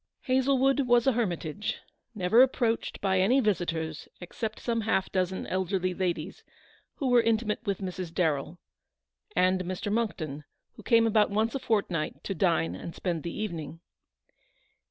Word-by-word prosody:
Hazlewood 265 +1 +2
was 240 -1 +4
a 270 - +5
hermi 220 -8 0
tage, 160 +7 -4 0.4
never 210 +4 +4
approached 245 -3 +1
by 190 -1 +2
any 230 +9 +4
visitors 165 - -1
except 215 +5 -5
some 230 -1 -1
half 205 -3 0
dozen 185 0 -1
elderly 185 0 -1
ladies, 180 -1 -3 0.5
who 275 - -2
were 245 -1 +6
intimate 225 0 0
with 200 0 -1
Mrs. 185 -2 -5
Darrell, 160 -2 -1 0.8
and 185 0 +3
Mr. 185 +3 -4
Monckton, 160 -10 -2 0.3
who - - -13
came 230 -2 +4
about 215 -1 +3
once 215 +3 0
a 275 - -2
fortnight 195 -10 -1
to 195 - -3
dine 80 - +1
and 165 - -7
spend 170 -4 -2
the 170 +4 -5
evening. 165 -6 -5
195 Hz, 150 wpm, -28 LUFS, 175-230 Hz, 0.8 s, were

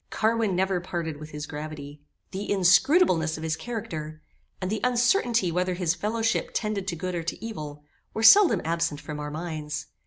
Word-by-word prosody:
Carwin 220 -3 +1
never 190 0 +1
parted 170 -4 -4
with 155 0 -9
his 150 0 -6
gravity. 150 -1 -8 0.3
The 200 +2 -5
inscrutableness 185 - +4
of 160 - -7
his 160 0 -1
character, 160 -9 -6 0.4
and 185 0 -3
the 215 - -2
uncertainty 245 - +2
whether 180 +1 0
his 175 -2 +1
fellowship 225 +4 -1
tended 210 -3 -2
to 175 - -2
good 185 +2 -4
or 170 - -2
to 165 +6 -5
evil, 150 -9 -7 0.3
were 220 - -3
seldom 395 - +7
absent 165 -2 -1
from 150 0 -7
our 150 0 -4
minds. 155 -1 -5
180 Hz, 175 wpm, -26 LUFS, 155-215 Hz, 0.4 s, seldom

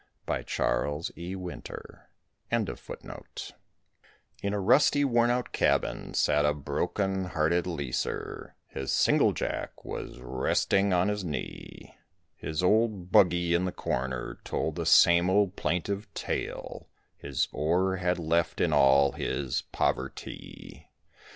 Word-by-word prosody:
THE - - -1 0.2
MINER'S 75 +3 0 0.6
SONG - - -7 1.2
In 100 0 -1
a - - -1
rusty, 145 +7 +4
worn 120 -2 +3
out 125 -1 0
cabin - - 0
sat 75 0 +3
a 75 0 +2
broken 95 +6 -1
hearted 85 0 +1
leaser, 70 -8 -4
His 65 0 -6
singlejack - - +2 0.2
was - - -6
resting 95 +10 +1
on 90 +1 +3
his 105 -1 -1
knee. 80 -4 -7 0.4
His 80 +2 -3
old 105 -2 +2
"buggy" 85 -2 +4
in 85 +2 +2
the 95 - -1
corner 65 -4 -3
told - - -2
the - - -3
same 85 +1 +6
old 100 0 +2
plaintive 100 +6 -2
tale, - - -4 0.3
His 70 -3 -1
ore 90 +5 +1
had 90 0 0
left 85 0 0
in - - +2
all 70 +1 +5
his 70 -3 -2
poverty. 65 +1 -4
90 Hz, 115 wpm, -28 LUFS, 75-100 Hz, 1.2 s, same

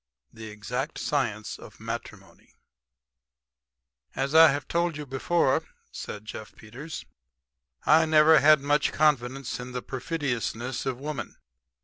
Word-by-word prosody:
THE 110 -1 -9
EXACT 125 +8 -4
SCIENCE 115 -7 -2
OF - - -13
MATRIMONY - - -8 1.6
"As 135 +2 -2
I 160 0 +9
have 140 0 -4
told 170 -2 0
you 150 - -6
before," 135 +2 +1 0.3
said 105 0 -7
Jeff 110 0 -9
Peters, 130 +9 -9 0.8
"I 160 +1 +5
never 155 0 +6
had 155 -1 +6
much 145 +1 +2
confidence 135 -4 0
in 125 0 -7
the 125 - -4
perfidiousness 130 -3 -3
of 130 -2 -2
woman. 150 +1 -5
135 Hz, 120 wpm, -27 LUFS, 120-155 Hz, 1.6 s, I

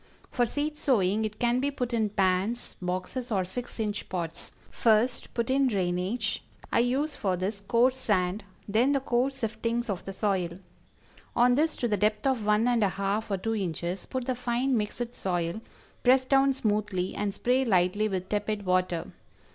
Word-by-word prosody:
For 245 -1 +2
seed 300 +4 -2
sowing 215 -4 +2
it 215 0 -5
can 240 +1 +2
be 280 +2 +1
put 250 -4 -3
in 220 -2 +1
pans, 195 +3 0
boxes 185 +8 -3
or 195 -5 +1
six 240 +6 -6
inch 210 -1 -2
pots. 170 -2 -4 0.2
First, 230 +2 +2
put 235 +1 0
in 270 0 +3
drainage 195 +2 -1 0.3
I - - +3
use 265 +6 +1
for 190 -3 0
this 195 +3 -2
coarse 240 +5 +3
sand 200 -4 0 0.2
then 235 +7 +3
the 275 - +2
coarse 265 +1 0
siftings 230 +1 -1
of 190 - -4
the 195 - -4
soil. 185 -4 -1 0.8
On 245 +1 +5
this 305 +4 +2
to 240 - -1
the 210 -2 +1
depth 210 +4 +1
of 260 -5 +1
one 210 +3 +3
and 240 -3 +3
a 200 - +3
half 200 +3 -2
or 195 - 0
two 225 +4 -2
inches, 180 -1 -3
put 260 -2 -3
the 260 - 0
fine 250 +2 0
mixed 230 +2 -2
soil, 175 +1 -2 0.4
press 260 +1 +5
down 270 +1 +4
smoothly 210 -6 -1
and 205 -1 -1
spray 250 +6 +1
lightly 205 -1 +2
with 185 -2 -3
tepid 205 0 -2
water. 185 -2 +1
215 Hz, 180 wpm, -28 LUFS, 190-245 Hz, 0.8 s, On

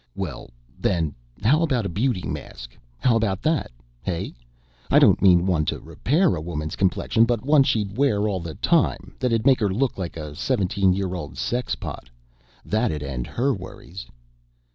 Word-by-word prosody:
"Well, - - -5 0.3
then, 80 -5 0 0.3
how 145 +9 +4
about 130 -9 +1
a - - +1
beauty 105 +2 -1
mask? - - -7 0.2
How 120 - +2
about 105 -4 0
that, 160 0 +1 0.3
hey? 85 -3 -3 0.6
I - - +5
don't - - +5
mean 90 -2 +5
one 85 -5 +2
to - - -2
repair 160 +6 +1
a 75 - -4
woman's 75 -2 -4
complexion, 100 +4 +2
but 120 -1 -1
one 145 0 +5
she'd 105 -6 0
wear 110 -6 +2
all 100 -3 -1
the 85 -3 -7
time - - +1
that'd 115 -4 0
make 135 -2 +5
her 105 -3 +1
look 115 +4 -1
like 85 -3 -4
a 75 -2 -6
17 100 - +1
year 95 -1 -2
old 85 -5 -6
sexpot. 120 - -3 0.6
That'd 105 -9 0
end 65 -3 -4
her 135 +3 0
worries." 95 - -9
100 Hz, 165 wpm, -24 LUFS, 85-125 Hz, 0.6 s, I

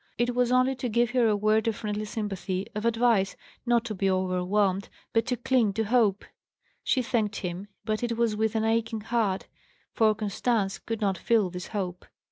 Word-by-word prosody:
It 240 +1 +1
was 245 0 +1
only 255 +1 +4
to 250 -1 -2
give 235 +1 +2
her 245 -2 +3
a 215 - +3
word 215 +2 +2
of 225 - +1
friendly 210 0 -3
sympathy, 195 -3 -3
of 215 +1 -4
advice 230 -4 +2 0.3
not 235 -1 +3
to 225 - -3
be 195 -1 0
overwhelmed, 185 +1 +1 0.2
but 225 +1 +2
to 250 - 0
cling 245 -5 +2
to 225 +2 0
hope. 215 -3 +2 0.6
She 255 - +1
thanked 220 -3 0
him, 180 +1 -4 0.2
but 215 -1 -1
it 235 -1 -1
was 230 -2 +1
with 220 +1 0
an 220 - +1
aching 225 0 0
heart, 210 -4 -1 0.5
for 215 -1 +3
Constance 210 0 -1
could 225 -1 -5
not 195 -3 0
feel 220 -6 +2
this 180 0 -6
hope. 185 -4 -4
215 Hz, 190 wpm, -27 LUFS, 200-235 Hz, 0.6 s, only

